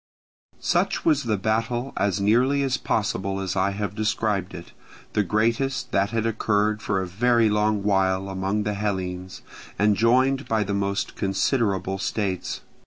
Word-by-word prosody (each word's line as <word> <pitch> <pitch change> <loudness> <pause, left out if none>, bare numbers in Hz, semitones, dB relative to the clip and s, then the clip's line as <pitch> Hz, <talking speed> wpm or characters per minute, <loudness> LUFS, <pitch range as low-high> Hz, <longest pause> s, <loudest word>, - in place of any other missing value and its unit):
Such - - 0
was 145 -5 +3
the 110 -3 +1
battle, 115 +5 -1
as 100 -1 0
nearly 125 +8 +3
as 135 -1 +1
possible 100 -5 -1
as 95 -1 -3
I 95 +1 +2
have 100 -1 -3
described 105 -3 -1
it; 85 - -10 0.4
the 105 - +2
greatest 115 +6 0
that 100 -3 +2
had 115 0 -1
occurred 105 -1 +1
for 100 -1 0
a 95 - -2
very 115 +3 +2
long 105 -1 +1
while 95 -1 +1
among 95 +2 -1
the 105 0 -1
Hellenes, 95 -3 -4 0.3
and 105 0 +3
joined 130 +5 +2
by 110 -1 +1
the 100 0 -3
most 100 0 -1
considerable 95 -1 0
states. 95 -2 -2
105 Hz, 155 wpm, -24 LUFS, 95-115 Hz, 0.4 s, was